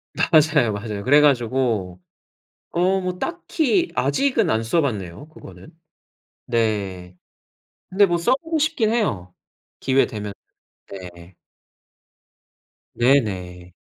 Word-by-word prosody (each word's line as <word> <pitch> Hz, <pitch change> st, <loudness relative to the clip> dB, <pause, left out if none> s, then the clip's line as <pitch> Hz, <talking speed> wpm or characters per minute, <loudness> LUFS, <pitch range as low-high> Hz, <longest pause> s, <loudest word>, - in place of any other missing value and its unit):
맞아요, 150 Hz, -8 st, +3 dB
맞아요. 100 Hz, 0 st, -5 dB
그래 145 Hz, +5 st, +5 dB
가지고 120 Hz, -9 st, 0 dB, 0.7 s
어 185 Hz, +3 st, +1 dB
뭐 180 Hz, -1 st, -4 dB
딱히 345 Hz, 0 st, -1 dB
아직은 250 Hz, -, +1 dB
안 110 Hz, +1 st, +1 dB
써 120 Hz, +9 st, +1 dB
봤네요, 110 Hz, -, -4 dB
그거는? 95 Hz, -, -14 dB, 0.8 s
네 100 Hz, -6 st, -2 dB, 0.7 s
근데 200 Hz, +2 st, +4 dB
뭐 175 Hz, -2 st, 0 dB
써보고 300 Hz, -, 0 dB
싶긴 290 Hz, -8 st, +1 dB
해요, 100 Hz, -, -2 dB, 0.5 s
기회되면. 110 Hz, -6 st, 0 dB, 0.6 s
네. 90 Hz, -2 st, -11 dB, 1.6 s
네네. 95 Hz, -9 st, 0 dB
125 Hz, 190 characters per minute, -22 LUFS, -, 1.6 s, 그래